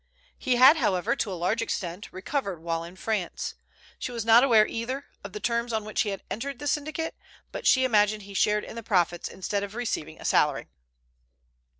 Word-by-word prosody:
He 255 - 0
had, 265 +6 +8
however, 200 - +1
to 215 - -2
a 185 - -4
large 185 +7 0
extent 185 -4 -4
recovered 195 - -3
while 165 -1 -2
in 170 +2 -10
France. 190 -2 -3 0.5
She - - -4
was 230 -2 -4
not 230 +2 +7
aware, 225 -5 +6
either, 255 +6 -4 0.2
of - - -7
the 420 - -5
terms 235 - -1
on 220 -2 -2
which 215 - 0
he 210 - 0
had 195 - -5
entered 275 +4 -4
the 290 - -8
syndicate, 310 +2 -2 0.4
but - - -3
she 260 - +5
imagined 210 -3 +2
he 200 0 -11
shared 210 +2 +2
in - - -9
the 230 - -5
profits 175 -5 0
instead 200 +2 -3
of 200 +1 -6
receiving 160 -10 -3
a - - -10
salary. 150 -2 +2
215 Hz, 200 wpm, -27 LUFS, 190-245 Hz, 0.5 s, had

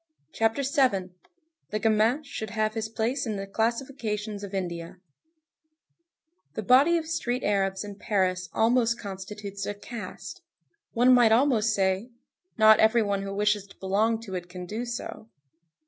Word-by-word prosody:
CHAPTER 225 +5 +1
VII—THE 265 - -2
GAMIN 225 +6 +2
SHOULD 220 -6 -6
HAVE 215 -1 -1
HIS 220 -1 -3
PLACE 230 +4 -1
IN 215 - -2
THE 195 0 -4
CLASSIFICATIONS 220 -1 -2
OF 200 - -6
INDIA 175 -3 -4 1.6
The 220 - -3
body 275 - +5
of 325 - -3
street 250 -6 -2
Arabs 195 -1 0
in 205 -1 -7
Paris 185 -4 0
almost 230 +2 +2
constitutes 200 0 -7
a 205 - -3
caste. 235 - -8 0.5
One 245 +2 +5
might 240 -3 +6
almost 225 -3 +3
say: 190 +4 0 0.5
Not 220 -1 +7
every 220 +1 +4
one 200 -1 -1
who 195 0 -5
wishes 205 0 0
to 190 - -18
belong 215 +4 +1
to 205 -4 -9
it 180 -1 -5
can 180 0 -7
do 220 +6 -4
so. 235 -2 -6
215 Hz, 145 wpm, -27 LUFS, 195-240 Hz, 1.6 s, Not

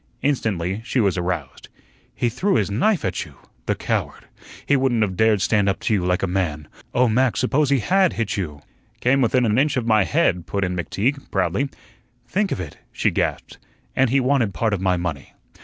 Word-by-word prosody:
Instantly 105 -8 -1
she 125 - -1
was 100 -6 +2
aroused. 85 -6 -4 0.5
"He 120 - 0
threw 190 - 0
his 100 -2 +1
knife 175 - +1
at 95 - -1
you! - - -14 0.3
The - - +1
coward! - - -3 0.4
He 145 - +3
wouldn't 130 -4 +2
of 95 -3 -2
dared 110 -2 +3
stand 100 -1 +2
up 95 - -1
to - - 0
you 95 -4 +1
like 90 +1 0
a - - +2
man. 85 -5 -2 0.2
Oh, 125 +1 +3
Mac, 125 +2 +2
suppose 135 +2 +1
he 140 - +4
HAD 190 - +3
hit 115 -3 -2
you?" 75 -7 -4 0.4
"Came 135 +2 +2
within 125 +1 +3
an 110 +2 +2
inch 145 0 +1
of 120 - -1
my 110 -3 +4
head," 85 0 +1
put 100 -1 -1
in 90 -1 -1
McTeague, 110 - -2
proudly. 140 +1 0 0.6
"Think 200 0 0
of - - -2
it!" 85 -6 -7
she - - 0
gasped; - - -2 0.4
"and 130 -1 +3
he 135 +3 +3
wanted 125 - +1
part 110 +4 0
of 95 - -1
my 95 -1 +2
money. 85 -5 -5
110 Hz, 205 wpm, -22 LUFS, 90-130 Hz, 0.6 s, he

